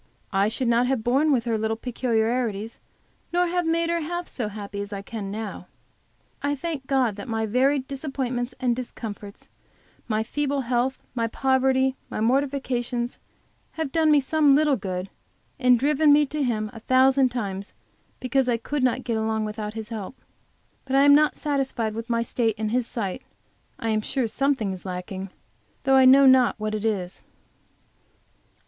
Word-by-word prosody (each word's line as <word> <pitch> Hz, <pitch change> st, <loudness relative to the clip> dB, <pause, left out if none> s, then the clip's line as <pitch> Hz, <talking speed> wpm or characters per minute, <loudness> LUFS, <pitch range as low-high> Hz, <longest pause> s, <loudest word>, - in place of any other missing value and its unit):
I 195 Hz, +1 st, +3 dB
should 235 Hz, +3 st, -1 dB
not 235 Hz, +1 st, +3 dB
have 260 Hz, -4 st, 0 dB
borne 275 Hz, +6 st, +3 dB
with 245 Hz, -4 st, +1 dB
her 225 Hz, -2 st, 0 dB
little 220 Hz, +1 st, -1 dB
peculiarities, 230 Hz, -2 st, -1 dB, 0.5 s
nor 355 Hz, +1 st, +2 dB
have 350 Hz, -1 st, -1 dB
made 335 Hz, +1 st, +1 dB
her 340 Hz, -, +1 dB
half 345 Hz, +3 st, -4 dB
so 235 Hz, -5 st, -4 dB
happy 200 Hz, -1 st, -6 dB
as 205 Hz, +1 st, -7 dB
I 200 Hz, -1 st, -5 dB
can 205 Hz, -1 st, -6 dB
now. 205 Hz, -3 st, -6 dB, 0.7 s
I 285 Hz, 0 st, 0 dB
thank 290 Hz, -3 st, -5 dB
God 255 Hz, -7 st, +1 dB
that 200 Hz, -, -7 dB
my 225 Hz, -1 st, -1 dB
varied 260 Hz, +4 st, +1 dB
disappointments 260 Hz, -3 st, -3 dB
and 250 Hz, -2 st, +1 dB
discomforts, 215 Hz, -4 st, -8 dB, 0.6 s
my 215 Hz, -1 st, 0 dB
feeble 285 Hz, +3 st, -1 dB
health, 250 Hz, +1 st, 0 dB, 0.2 s
my 230 Hz, -2 st, 0 dB
poverty, 265 Hz, +1 st, +1 dB
my -, -, -4 dB
mortifications 250 Hz, -1 st, -1 dB, 0.5 s
have 320 Hz, -4 st, -3 dB
done 320 Hz, 0 st, +3 dB
me 300 Hz, -1 st, +6 dB
some 285 Hz, 0 st, +3 dB
little 300 Hz, -1 st, +3 dB
good, 185 Hz, -4 st, -5 dB, 0.5 s
and 250 Hz, -2 st, +5 dB
driven 295 Hz, +4 st, +3 dB
me 295 Hz, +1 st, +6 dB
to 300 Hz, +2 st, -4 dB
Him 215 Hz, -5 st, -1 dB
a 225 Hz, -, -9 dB
thousand 260 Hz, +2 st, +4 dB
times 200 Hz, -5 st, -5 dB, 0.4 s
because 255 Hz, 0 st, +1 dB
I 235 Hz, -, +2 dB
could 285 Hz, +5 st, -3 dB
not 255 Hz, 0 st, +1 dB
get 230 Hz, -3 st, -1 dB
along 220 Hz, 0 st, -1 dB
without 210 Hz, 0 st, -5 dB
His 220 Hz, 0 st, -6 dB
help. 225 Hz, +2 st, -7 dB, 0.7 s
But 265 Hz, 0 st, -1 dB
I 275 Hz, -, +6 dB
am 285 Hz, 0 st, +7 dB
not 300 Hz, +1 st, +4 dB
satisfied 270 Hz, -6 st, -1 dB
with 230 Hz, +1 st, -6 dB
my 230 Hz, 0 st, +1 dB
state 230 Hz, -2 st, 0 dB
in 215 Hz, 0 st, -2 dB
His 240 Hz, +1 st, 0 dB
sight. 200 Hz, -6 st, -4 dB, 0.6 s
I 225 Hz, -, -3 dB
am 215 Hz, -1 st, +1 dB
sure 250 Hz, +2 st, -1 dB
something 265 Hz, -3 st, 0 dB
is 185 Hz, -1 st, -7 dB
lacking, 185 Hz, +1 st, -5 dB, 0.5 s
though 270 Hz, -1 st, +4 dB
I 265 Hz, -1 st, +6 dB
know 270 Hz, +2 st, +8 dB
not 260 Hz, -3 st, +5 dB
what 215 Hz, 0 st, -2 dB
it 215 Hz, 0 st, -3 dB
is. 190 Hz, -5 st, -2 dB
245 Hz, 175 wpm, -25 LUFS, 220-270 Hz, 0.7 s, know